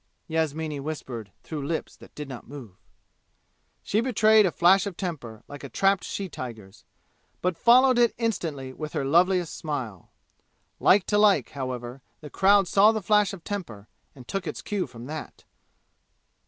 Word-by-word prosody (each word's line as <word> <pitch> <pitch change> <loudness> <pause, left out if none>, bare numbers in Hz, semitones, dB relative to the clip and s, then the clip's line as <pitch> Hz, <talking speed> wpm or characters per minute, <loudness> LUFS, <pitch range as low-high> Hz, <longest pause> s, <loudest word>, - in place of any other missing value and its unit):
Yasmini 160 -2 -2
whispered 130 -8 -6
through 150 -3 -5
lips 160 +3 -4
that - - -17
did 150 -1 -6
not 130 -3 -9
move. 125 -9 -10 1.1
She 215 - +1
betrayed 220 -4 +4
a - - -1
flash 185 +4 +4
of 185 -4 -7
temper 135 - -6
like 145 0 -10
a 140 - -7
trapped 195 +8 +2
she 195 - -4
tiger's, 110 - -9 0.5
but 180 -1 -1
followed 250 +5 +5
it 235 -1 +3
instantly 160 - -3
with 155 +2 -7
her 135 - -2
loveliest 175 +3 +2
smile. 130 - -5 0.7
Like 195 0 +4
to 205 - +1
like, 200 - +4
however, 130 -1 -6 0.2
the 150 -2 -11
crowd 200 0 +4
saw 200 +4 +5
the 220 -2 -3
flash 210 +1 +3
of 190 -4 -10
temper 120 - -6 0.3
and 125 -3 -14
took 195 +7 -4
its - - -5
cue 205 -3 -2
from 120 0 -11
that. 155 +2 -8
160 Hz, 160 wpm, -26 LUFS, 135-200 Hz, 1.1 s, followed